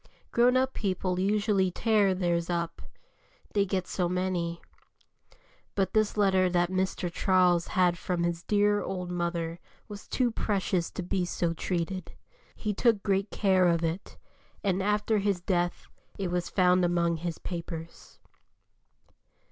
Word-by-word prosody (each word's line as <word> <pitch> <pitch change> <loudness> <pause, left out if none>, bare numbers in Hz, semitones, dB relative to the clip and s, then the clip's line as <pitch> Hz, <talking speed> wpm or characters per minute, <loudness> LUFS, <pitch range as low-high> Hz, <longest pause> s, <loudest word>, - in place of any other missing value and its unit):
Grown 245 +2 +4
up 260 0 +1
people 185 -2 -1
usually 200 -1 +2
tear 205 0 +2
theirs 175 -2 0
up, 170 -1 -2 0.7
they 200 -1 +2
get 185 -1 -1
so 180 -2 -1
many. 180 -2 -1 1.2
But 190 -2 0
this 215 -1 +1
letter 190 -2 +3
that 175 0 +1
Mr. 185 -2 -1
Charles 180 -3 +3
had 180 -2 +2
from 175 -2 -1
his 170 -1 -1
dear 205 +1 +2
old 180 -2 -4
mother 170 -1 -2 0.3
was 205 -1 -9
too 245 -2 +1
precious 190 -5 -1
to 185 - -5
be 180 +1 -1
so 170 -1 -1
treated; 175 +1 -3 0.4
he 210 -1 -2
took 215 -1 +2
great 195 0 +1
care 190 -3 +3
of 170 -1 +2
it, 165 +4 -3 0.5
and 195 -2 +1
after 210 +2 +1
his 200 -2 0
death 175 -1 -1 0.3
it 190 -3 -2
was 175 -1 -1
found 180 -1 +3
among 170 -1 +1
his 170 0 -4
papers. 165 -2 -7
185 Hz, 140 wpm, -28 LUFS, 175-200 Hz, 1.2 s, Grown